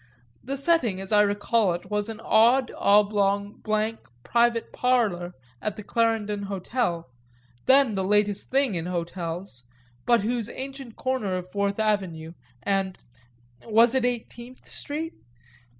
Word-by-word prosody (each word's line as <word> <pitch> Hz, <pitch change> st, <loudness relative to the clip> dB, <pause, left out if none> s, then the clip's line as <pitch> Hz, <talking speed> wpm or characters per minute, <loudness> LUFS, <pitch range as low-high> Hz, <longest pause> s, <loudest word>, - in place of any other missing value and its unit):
The 275 Hz, +2 st, -4 dB
setting, 275 Hz, -, +2 dB
as 195 Hz, +1 st, -6 dB
I 210 Hz, -1 st, +6 dB
recall 205 Hz, -1 st, +2 dB
it, 175 Hz, +3 st, -7 dB
was 210 Hz, +1 st, -1 dB
an 220 Hz, -1 st, -6 dB
odd, 240 Hz, +4 st, +4 dB
oblong, 200 Hz, 0 st, +2 dB
blank 215 Hz, +1 st, -1 dB, 0.2 s
"private 235 Hz, -1 st, +1 dB
parlour" 205 Hz, -9 st, 0 dB, 0.3 s
at 215 Hz, -2 st, -2 dB
the 210 Hz, -, -8 dB
Clarendon 220 Hz, -2 st, 0 dB
Hotel, 195 Hz, -2 st, -2 dB, 0.6 s
then 265 Hz, -3 st, +5 dB
the 190 Hz, -1 st, -1 dB
latest 205 Hz, +1 st, +1 dB
thing 270 Hz, -4 st, +2 dB
in 170 Hz, -1 st, -3 dB
hotels, 170 Hz, -4 st, -5 dB, 0.4 s
but 235 Hz, -2 st, +4 dB
whose 230 Hz, +1 st, -2 dB
ancient 270 Hz, -3 st, -7 dB
corner 255 Hz, -8 st, -1 dB
of 180 Hz, 0 st, -8 dB
Fourth 200 Hz, 0 st, -1 dB
Avenue 190 Hz, -7 st, -1 dB, 0.3 s
and 195 Hz, -2 st, -1 dB, 0.7 s
was 230 Hz, +2 st, +4 dB
it 260 Hz, -2 st, +1 dB
Eighteenth 245 Hz, +1 st, -4 dB
Street? 315 Hz, +3 st, -5 dB
210 Hz, 135 wpm, -25 LUFS, 195-240 Hz, 0.7 s, I